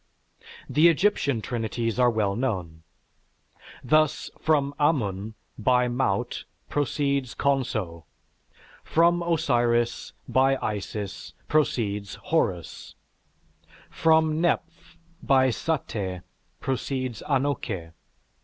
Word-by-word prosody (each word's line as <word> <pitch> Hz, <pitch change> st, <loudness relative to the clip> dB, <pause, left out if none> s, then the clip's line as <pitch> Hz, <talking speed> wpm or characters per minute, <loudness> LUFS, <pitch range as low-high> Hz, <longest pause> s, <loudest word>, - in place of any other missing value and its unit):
The 155 Hz, +3 st, +5 dB
Egyptian 160 Hz, -, +1 dB
trinities 115 Hz, 0 st, -2 dB
are 125 Hz, -1 st, +5 dB
well 105 Hz, -4 st, 0 dB
known: 90 Hz, -10 st, -3 dB, 1.0 s
thus, 155 Hz, +4 st, +2 dB
from 145 Hz, -3 st, +1 dB
Amun 110 Hz, -, 0 dB, 0.2 s
by 125 Hz, +2 st, +3 dB
Maut 120 Hz, -6 st, -1 dB, 0.2 s
proceeds 140 Hz, -2 st, -1 dB
Khonso; 110 Hz, -, -1 dB, 0.8 s
from 170 Hz, +1 st, +3 dB
Osiris 120 Hz, -8 st, +1 dB
by 135 Hz, +1 st, +3 dB
Isis 105 Hz, -1 st, -5 dB
proceeds 105 Hz, -9 st, 0 dB
Horus; 95 Hz, -, -2 dB, 1.0 s
from 160 Hz, -1 st, +3 dB
Neph 170 Hz, -1 st, -2 dB, 0.2 s
by 130 Hz, -2 st, +4 dB
Saté 105 Hz, -, -3 dB, 0.4 s
proceeds 130 Hz, -3 st, -3 dB
Anouké. 125 Hz, -, -1 dB
125 Hz, 80 wpm, -26 LUFS, 105-145 Hz, 1.0 s, The